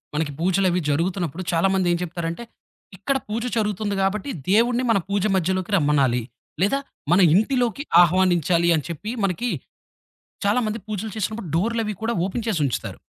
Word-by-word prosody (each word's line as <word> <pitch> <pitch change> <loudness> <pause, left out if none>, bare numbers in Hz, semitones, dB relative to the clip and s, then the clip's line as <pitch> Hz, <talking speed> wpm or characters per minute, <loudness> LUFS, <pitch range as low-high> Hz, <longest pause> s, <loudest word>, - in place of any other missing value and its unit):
మనకి 150 -1 -1
పూజలవి 185 +1 +2
జరుగుతున్నప్పుడు, 175 +2 -1
చాలామందేం 180 0 +2
జేప్తారంటే. 170 +3 -4 0.5
ఇక్కడ 270 +8 0
పూజ 225 +2 -2
జరుగుతుంది 210 -1 -1
గాబట్టి, 195 +5 -1 0.2
దేవుడిని 240 +4 +3
మన 220 - +4
పూజ 200 -1 0
మజ్యలోకి 185 +2 -1
రమ్మనాలి. 140 -6 +2 0.4
లేదా 210 +8 +2 0.3
మన 180 - +5 0.2
ఇంటిలోకి 245 +4 +1 0.2
ఆహ్వానించాలి 175 -1 +3
అని 150 - -2
చెప్పి. 170 +6 -5
మనకి, 195 +6 0 1.0
చాలామంది 215 +1 +1
పూజలు 215 0 -4
చేసినప్పుడు 215 -3 -3
డోర్‌లవి 220 +4 0
కూడా 230 +1 -1
ఓపెన్ 225 +4 -4
చేసుంచుతారు. 150 - -2
190 Hz, 130 wpm, -23 LUFS, 170-215 Hz, 1.0 s, మన